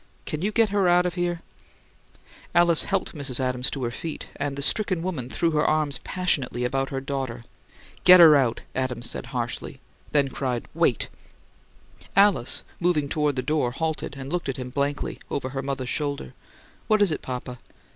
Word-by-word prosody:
"Can 155 - -4
you 205 +4 0
get 225 0 +3
her 200 -2 +2
out 175 0 +4
of 180 - -1
here?" 175 -1 -2 1.1
Alice 170 -2 +5
helped 195 -2 -1
Mrs. 140 -5 -1
Adams 125 -1 0
to 135 - -4
her 120 - -1
feet; 160 +5 -6
and 140 -1 -2
the 140 - -3
stricken 185 -1 +1
woman 155 -10 -3
threw 170 +4 0
her 150 -1 +2
arms 155 -3 +1
passionately 140 -9 -1
about 135 +2 -1
her 135 - -3
daughter. 135 -4 -4 0.6
"Get 180 0 +9
her 160 -3 +9
out!" 130 -5 +2
Adams 125 -2 -2
said, - - -6
harshly; - - -4 0.3
then 140 -2 +3
cried, 125 -2 -2
"Wait!" - - +1 1.1
Alice, 195 -11 +3 0.2
moving 165 -5 +1
toward 150 -2 +1
the 130 - -1
door, 150 -3 +1
halted, 155 +1 -3
and 135 +3 -6
looked 175 -5 -1
at 135 - -3
him 125 -1 -6
blankly, 140 +1 -2
over 130 -2 -2
her 135 0 -3
mother's 135 -2 -3
shoulder. 140 - -2 0.5
"What 215 -1 +4
is 195 - +2
it, 155 - -2
papa?" 125 -1 -6
145 Hz, 175 wpm, -25 LUFS, 130-175 Hz, 1.1 s, Get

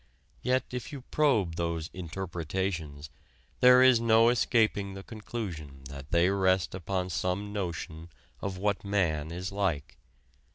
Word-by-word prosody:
Yet 130 +1 +2
if 125 +4 -5
you 140 -3 -7
probe 110 - +2
those 85 -1 -2
"interpretations" 85 -4 -4 0.5
there 125 0 +8
is 130 -3 +6
no 115 0 +5
escaping 110 -5 +1
the 95 - -8
conclusion 90 - -7
that 70 0 -9
they 85 +1 +4
rest 95 -2 +2
upon 95 0 -2
some 95 +4 -2
notion 85 -4 -4 0.3
of 95 -2 -3
what 100 +1 0
man 85 -7 0
is 90 +3 -4
like. 95 -8 -2
95 Hz, 130 wpm, -29 LUFS, 85-105 Hz, 0.5 s, there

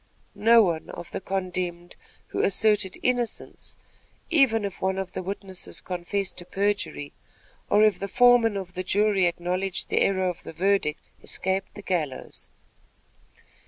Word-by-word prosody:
No 230 +1 +6
one 170 -4 -1
of 170 - -8
the - - -4
condemned 180 -2 -3 0.3
who - - -1
asserted 210 -1 +2
innocence, 245 -2 -2 0.5
even 255 -9 +4
if 195 - -6
one 190 0 0
of 190 -1 -4
the - - -4
witnesses 190 0 -5
confessed 185 +2 -3
to 175 - -5
perjury, 200 -7 -2 0.6
or 210 +1 +6
the 200 -1 -1
foreman 240 -1 +5
of 185 -2 -6
the 185 0 -3
jury 200 -1 +3
acknowledged 180 +2 -1
the - - +2
error 190 -1 +2
of 180 -2 -4
the - - -9
verdict, 185 -4 +1 0.2
escaped 190 0 -2
the 205 - -9
gallows. 165 -8 -3
190 Hz, 140 wpm, -26 LUFS, 180-205 Hz, 0.6 s, No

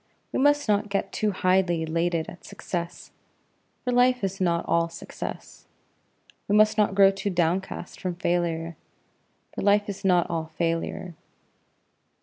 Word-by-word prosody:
We - - -1
must 290 0 +3
not 210 0 +1
get 200 0 -1
too 215 - 0
highly 185 -3 +1
elated 165 0 -1
at 175 - -11
success, 170 -1 -6 0.7
for 250 - -1
life 250 -1 +3
is 195 0 -2
not 170 -2 +1
all 170 0 +2
success. 170 - -8 0.8
We 205 - +2
must 215 0 +5
not 210 -3 +2
grow 195 -1 +7
too 195 +1 -3
downcast 175 0 -2
from 180 -2 -2
failure, 170 -2 -1 0.8
for - - -5
life 205 +1 +3
is 200 0 -6
not 180 -3 +3
all 165 -1 -3
failure. 165 +1 -2
185 Hz, 140 wpm, -26 LUFS, 170-205 Hz, 0.8 s, grow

